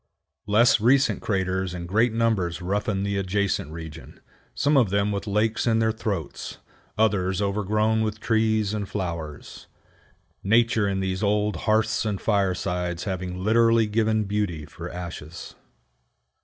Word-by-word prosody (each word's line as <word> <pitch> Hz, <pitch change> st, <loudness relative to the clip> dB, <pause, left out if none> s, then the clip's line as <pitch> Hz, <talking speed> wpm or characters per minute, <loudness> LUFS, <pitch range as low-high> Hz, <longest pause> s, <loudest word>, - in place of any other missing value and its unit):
Less 115 Hz, +3 st, +5 dB
recent 135 Hz, +5 st, +3 dB
craters 95 Hz, -2 st, -1 dB
in 85 Hz, -1 st, -5 dB
great 110 Hz, +6 st, +2 dB
numbers 110 Hz, -7 st, 0 dB
roughen 100 Hz, +2 st, -1 dB
the 100 Hz, 0 st, -1 dB
adjacent 95 Hz, -4 st, -1 dB
region; 80 Hz, -1 st, -9 dB, 0.4 s
some 145 Hz, +1 st, +2 dB
of 125 Hz, -7 st, +4 dB
them 100 Hz, +1 st, +1 dB
with 100 Hz, +1 st, -3 dB
lakes 110 Hz, +3 st, 0 dB
in 115 Hz, -1 st, +3 dB
their 110 Hz, 0 st, +2 dB
throats, 100 Hz, -9 st, -4 dB, 0.4 s
others 95 Hz, -4 st, +1 dB
overgrown 105 Hz, +2 st, +1 dB
with 110 Hz, 0 st, -2 dB
trees 110 Hz, -1 st, +1 dB
and 105 Hz, -2 st, -3 dB
flowers, 85 Hz, -6 st, -6 dB, 0.8 s
Nature 115 Hz, 0 st, +3 dB
in 95 Hz, -1 st, -1 dB
these 95 Hz, 0 st, -2 dB
old 105 Hz, 0 st, +1 dB
hearths 110 Hz, +1 st, +2 dB
and 105 Hz, -3 st, -2 dB
firesides 90 Hz, -4 st, -1 dB
having 90 Hz, -1 st, -4 dB
literally 115 Hz, +1 st, +4 dB
given 110 Hz, 0 st, +1 dB
beauty 100 Hz, -7 st, -2 dB
for 85 Hz, +3 st, -8 dB
ashes. 85 Hz, -2 st, -8 dB
100 Hz, 135 wpm, -25 LUFS, 90-110 Hz, 0.8 s, Less